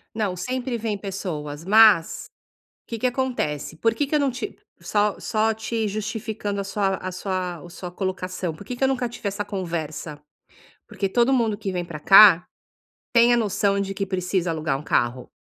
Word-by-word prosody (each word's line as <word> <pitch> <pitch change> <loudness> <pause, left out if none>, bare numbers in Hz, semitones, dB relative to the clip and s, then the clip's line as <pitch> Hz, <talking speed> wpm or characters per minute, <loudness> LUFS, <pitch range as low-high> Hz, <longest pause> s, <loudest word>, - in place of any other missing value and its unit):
Não, 210 -4 -1
sempre 255 +2 -3
vêm 220 -2 -2
pessoas, 165 -6 -5
mas 215 -4 +5 0.6
que 230 - -4
que 240 - -3
acontece? 245 - -2
Por 225 +7 +2
que 280 +5 -1
que 300 - -1
eu - - +4
não 280 -2 +1
ti 265 +11 -6 0.2
só 210 -1 0
só 220 0 +1
te 220 0 -2
justificando 210 -1 -3
a - - -4
sua 195 0 0
a 185 - -5
sua 185 -2 -3
o 175 - -11
sua 175 +1 -8
colocação. 185 -2 -3
Por 200 - -12
que 250 - -5
eu 265 - +5
nunca 255 -2 0
tive 225 - -6
essa 200 +1 -3
conversa? 165 -5 -5 0.7
Porque 195 - -3
todo 240 +6 +2
mundo 230 -5 +2
que 200 -3 -4
vem 180 -1 -2
pra 165 -3 -7
cá 195 0 +8 0.7
tem 235 0 +6
a - - +3
noção 205 -2 +1
de 195 0 -2
que 195 0 -2
precisa 185 -1 -1
alugar 155 -4 -1
um - - -9
carro 125 -3 0
200 Hz, 185 wpm, -23 LUFS, 180-225 Hz, 0.7 s, cá